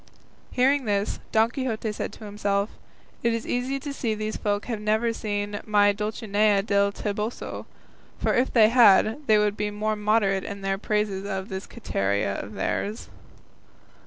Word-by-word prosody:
Hearing 270 +2 +3
this, 205 -1 -1
Don 225 +1 +3
Quixote 235 -5 -2
said 210 - -4
to - - -12
himself, 205 0 -1 0.5
"It 235 -1 +1
is 230 - -4
easy 255 +3 -1
to 285 0 -5
see 230 -5 -1
these 215 0 -3
folk 205 0 -1
have 225 -4 -4
never 220 +2 +1
seen 205 -1 -3
my 205 -1 +4
Dulcinea 210 -1 +1
del 200 -1 +2
Toboso; 210 +3 -4 0.5
for - - 0
if 255 +2 +2
they 220 -3 +6
had 225 0 +5
they 215 - +6
would 210 -1 +2
be 210 0 -2
more 215 +1 -1
moderate 210 -2 +1
in 200 0 -6
their 195 0 -1
praises 210 -2 -1
of 190 -1 -4
this 190 0 -5
Quiteria 100 - -1
of - - -9
theirs." 210 +2 -3
210 Hz, 160 wpm, -25 LUFS, 200-225 Hz, 0.5 s, they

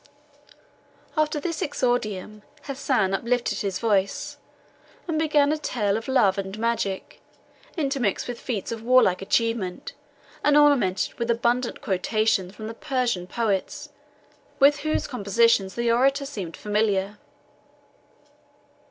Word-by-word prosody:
After 305 -1 +1
this 330 +1 -4
exordium, 215 -7 -2 0.2
Hassan 260 -8 0
uplifted 240 +4 0
his 195 -2 -2
voice, 200 -3 0 0.7
and 320 -2 -1
began 295 -2 +3
a 310 - -1
tale 205 -8 -1
of 225 +1 -4
love 210 -7 +3
and 195 +1 -5
magic, 220 -4 -2 0.6
intermixed 275 - -1
with 245 -1 -5
feats 220 -6 -4
of 225 -1 -5
warlike 230 -6 +4
achievement, 210 -2 -1 0.5
and 295 0 +4
ornamented 280 -11 +3
with 235 0 -2
abundant 235 +1 0
quotations 205 -3 0
from 215 - -8
the 225 - -5
Persian 250 -9 -2
poets, 235 +8 -2 0.7
with 285 +1 +5
whose 310 +1 -1
compositions 210 -3 +2
the 235 0 +1
orator 275 +4 +2
seemed 195 - -6
familiar. 210 -1 0
230 Hz, 115 wpm, -24 LUFS, 200-275 Hz, 0.7 s, with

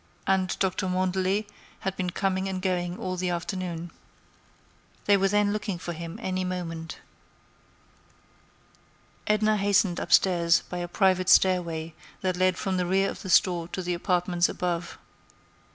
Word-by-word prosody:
And 190 -1 +1
Dr. 190 0 0
Mandelet 185 +2 0 0.4
had 195 0 -2
been 180 -1 -2
coming 190 +1 -1
and 190 -1 -3
going 180 -1 -1
all 185 0 -4
the 180 0 -1
afternoon. 175 -1 -4 1.1
They 205 - +5
were 195 0 +2
then 205 +1 +2
looking 210 -3 -3
for 175 0 -5
him 170 +3 -7
any 185 -4 -2
moment. 165 -3 -5 2.3
Edna 215 0 +3
hastened 200 -3 +2
upstairs 170 -3 +3
by 180 - -5
a 175 - -3
private 185 0 +2
stairway 170 -4 +3 0.3
that 185 -1 0
led 185 0 +2
from 190 -2 -1
the 180 -1 0
rear 195 +2 +2
of - - -9
the 190 - -7
store 170 -1 +3
to 185 +1 -5
the 180 0 -1
apartments 175 -1 +1
above. 175 -1 -3
185 Hz, 145 wpm, -27 LUFS, 175-190 Hz, 2.3 s, They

